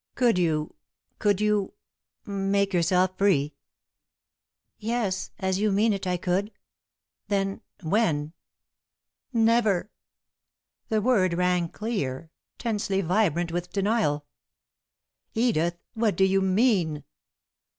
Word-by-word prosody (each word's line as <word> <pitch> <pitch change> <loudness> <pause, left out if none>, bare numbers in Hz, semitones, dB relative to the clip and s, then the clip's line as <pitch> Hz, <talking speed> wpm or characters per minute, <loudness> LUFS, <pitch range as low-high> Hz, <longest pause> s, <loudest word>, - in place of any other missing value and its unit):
"Could 240 -7 +3
you 155 -3 0 0.5
could 205 -2 +2
you 210 -2 +1 0.5
make 200 -1 0
yourself 180 +2 +2
free?" 155 -8 +2 1.3
"Yes, 215 -4 -1
as 190 0 -1
you 210 0 +2
mean 210 +3 +3
it, 195 -1 -4
I 180 0 +1
could." 185 +4 -1 0.8
"Then 195 -1 -1 0.2
when?" 160 -5 +1 1.0
"Never!" 225 -5 +2 1.0
The 215 -2 +1
word 200 -8 +3
rang 180 -1 +1
clear, 165 - -4 0.3
tensely 205 -4 -1
vibrant 175 -2 +1
with 175 +1 -3
denial. 195 -8 0 1.1
"Edith! 175 -8 +1 0.2
What 220 -3 +1
do 190 - +3
you 190 0 +3
mean?" 190 - +2
195 Hz, 100 wpm, -26 LUFS, 175-215 Hz, 1.3 s, Could